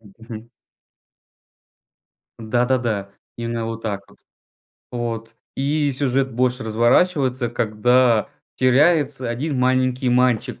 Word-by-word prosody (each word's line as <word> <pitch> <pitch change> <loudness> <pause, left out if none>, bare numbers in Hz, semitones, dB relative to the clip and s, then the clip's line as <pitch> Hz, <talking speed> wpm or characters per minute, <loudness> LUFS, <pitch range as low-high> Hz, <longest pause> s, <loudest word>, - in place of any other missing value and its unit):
Мгм. 115 +2 -12 1.9
Да-да-да 115 -3 -1 0.3
именно 115 -1 -3
вот 115 0 -6
так 105 -3 -3
вот. - - -21 0.7
Вот 115 -2 -5 0.2
и 145 +2 0
сюжет 135 -1 0
больше 125 +2 0
разворачивается 125 +3 +2
когда 120 0 +2 0.3
теряется 135 0 +2
один 135 +4 -3
маленький 130 0 +1
мальчик 125 -2 +1
125 Hz, 90 wpm, -21 LUFS, 115-130 Hz, 1.9 s, разворачивается